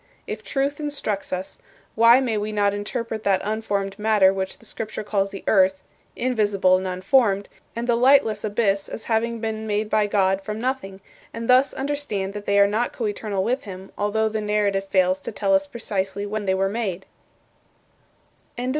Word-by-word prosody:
If 215 0 -6
Truth 275 +7 -1
instructs 285 -9 -3
us, 185 +1 -4 0.3
why 230 +2 +6
may 245 -4 -1
we 210 +1 -2
not 205 -1 +1
interpret 220 +2 -4
that 195 -2 +3
unformed 200 -2 -2
matter 210 -3 +4
which 190 0 -3
the - - -16
Scripture 215 0 -5
calls 200 -1 0
the 195 -1 -9
earth 190 -2 +3 0.3
invisible 205 -7 +2
and 185 0 -3
unformed 195 +2 +2 0.3
and 235 +1 -3
the 240 - +3
lightless 240 -4 +4
abyss 205 -2 0
as - - -7
having 230 +1 0
been 220 -1 -3
made 210 0 -1
by 215 -1 +3
God 195 -1 +2
from 210 +2 -5
nothing; 225 -6 -3 0.3
and 230 0 -4
thus 255 +2 +5
understand 265 -9 -3
that 205 0 -7
they 200 - +3
are 200 - +7
not 215 +4 -1
coeternal 205 -3 -2
with 250 +5 -1
him, 190 -1 -9
although 215 +2 0
the 220 0 -2
narrative 205 -2 0
fails 185 -1 +2
to - - -6
tell 290 +7 0
us 290 0 +3
precisely 200 -6 -3
when 205 0 -4
they 190 - +2
were 195 +1 +1
made?" 195 -3 -3
210 Hz, 175 wpm, -23 LUFS, 195-230 Hz, 0.3 s, are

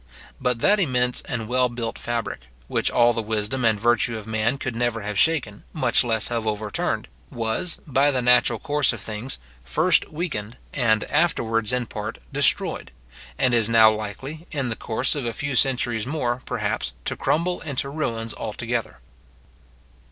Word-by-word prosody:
But 125 -2 0
that 205 +1 +5
immense 125 -7 +2
and 115 -3 -3
well 125 +1 +2
built 120 -1 -4
fabric, 120 -3 -3 0.3
which - - +1
all 120 0 +4
the 115 - -1
wisdom 110 +3 -2
and 110 -2 +3
virtue 120 0 +2
of 110 - -8
man 110 +4 0
could 130 -3 -4
never 120 -1 0
have 105 +1 -4
shaken, 140 -11 +1
much 155 - +3
less 110 -3 0
have 115 -2 -2
overturned, 105 -1 -2 0.2
was, 115 +9 -1
by 140 0 +3
the 130 -3 +1
natural 125 0 +4
course 150 -4 +1
of 120 - -6
things, 110 +5 -4 0.3
first 160 - +3
weakened, 150 - -4 0.2
and 110 -5 +2
afterwards 115 -9 +1
in 125 -1 0
part 105 0 -5 0.2
destroyed; 140 - +1 0.5
and 130 -2 +2
is 115 -2 +3
now 110 -1 +7
likely, 130 - -6
in 140 -5 -2
the 115 - -2
course 120 +4 0
of 145 -3 -3
a 115 - -2
few 140 +2 -3
centuries 120 -2 +1
more, 125 -4 -1
perhaps, 60 - -2
to - - -1
crumble 175 +3 0
into 140 -3 -2
ruins 115 -7 -3
altogether. 115 +1 -4
120 Hz, 165 wpm, -24 LUFS, 110-135 Hz, 0.5 s, now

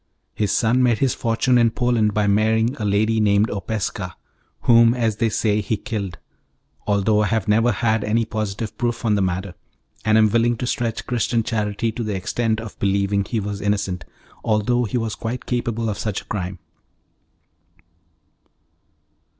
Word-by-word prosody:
His 105 -2 -1
son 120 +2 +2
made 120 -3 +3
his 135 +1 +1
fortune 120 +2 +1
in 115 -1 +4
Poland 115 -2 +1
by 105 0 +1
marrying 110 +4 +2
a 110 - -3
lady 110 +2 +2
named 105 0 +3
Opeska, 100 -2 -3 0.5
whom, 115 0 +5
as 115 -4 0
they 115 - +1
say, 105 0 +1
he 105 +2 -1
killed, 100 -6 -4 0.7
though 105 +1 +2
I 105 - +1
have 110 -1 -1
never 115 +3 +3
had 110 0 0
any 115 +2 +1
positive 110 0 -4
proof 120 -1 -1
on 110 - +3
the 100 - +2
matter, 95 0 -2 0.5
and 110 0 +3
am 110 -1 +4
willing 115 +1 +2
to 125 - -3
stretch 120 -3 -2
Christian 120 -1 0
charity 110 -1 -1
to 115 +2 -4
the 105 -2 -2
extent 110 +4 -1
of 110 -1 -9
believing 100 0 +1
he 115 - -2
was 100 0 -4
innocent, 100 -4 -1 0.4
although 115 +3 +1
he 110 +3 -2
was 115 -2 -2
quite 115 +2 -5
capable 115 -2 -2
of 105 -2 -3
such 105 -3 -2
a - - -21
crime. 95 -2 -4
110 Hz, 165 wpm, -22 LUFS, 100-115 Hz, 0.7 s, whom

